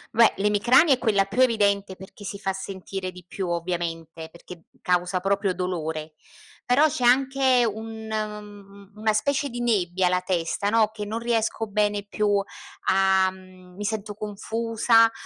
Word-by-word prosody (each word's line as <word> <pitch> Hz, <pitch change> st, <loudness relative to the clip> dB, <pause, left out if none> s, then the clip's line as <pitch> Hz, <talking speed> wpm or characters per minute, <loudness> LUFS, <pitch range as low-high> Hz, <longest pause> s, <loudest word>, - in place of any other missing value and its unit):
Beh 230 Hz, 0 st, +6 dB
l'emicrania 210 Hz, -, +4 dB
è -, -, +1 dB
quella 210 Hz, -6 st, +2 dB
più 205 Hz, +6 st, -1 dB
evidente 200 Hz, -5 st, +2 dB
perchè 190 Hz, +2 st, -13 dB
si 200 Hz, 0 st, -6 dB
fa 195 Hz, -2 st, -2 dB
sentire 190 Hz, -1 st, -6 dB
di 180 Hz, -1 st, -14 dB
più, 185 Hz, -1 st, -4 dB
ovviamente, 165 Hz, -2 st, -4 dB
perché 170 Hz, 0 st, -13 dB, 0.2 s
causa 180 Hz, +1 st, 0 dB
proprio 195 Hz, 0 st, 0 dB
dolore. 160 Hz, -4 st, -4 dB, 0.5 s
Però 270 Hz, +5 st, +4 dB
c'è 260 Hz, -4 st, -3 dB
anche 260 Hz, 0 st, +4 dB
un 220 Hz, +1 st, -7 dB
mhmm, 205 Hz, -2 st, -7 dB
una 215 Hz, +1 st, +1 dB
specie 280 Hz, +6 st, 0 dB
di 240 Hz, -, -6 dB
nebbia 190 Hz, -6 st, +1 dB
alla 180 Hz, 0 st, +1 dB
testa, 180 Hz, +2 st, -1 dB
no, 225 Hz, -1 st, +4 dB
che 210 Hz, -1 st, -6 dB
non 220 Hz, +2 st, -3 dB
riesco 225 Hz, -1 st, -1 dB
bene 205 Hz, 0 st, 0 dB
più 205 Hz, -1 st, +1 dB, 0.5 s
a 190 Hz, 0 st, +4 dB
mhmm, 185 Hz, -1 st, -15 dB
mi 205 Hz, -, -6 dB
sento 210 Hz, 0 st, -3 dB
confusa, 225 Hz, +2 st, +2 dB
205 Hz, 155 wpm, -25 LUFS, 185-225 Hz, 0.5 s, Beh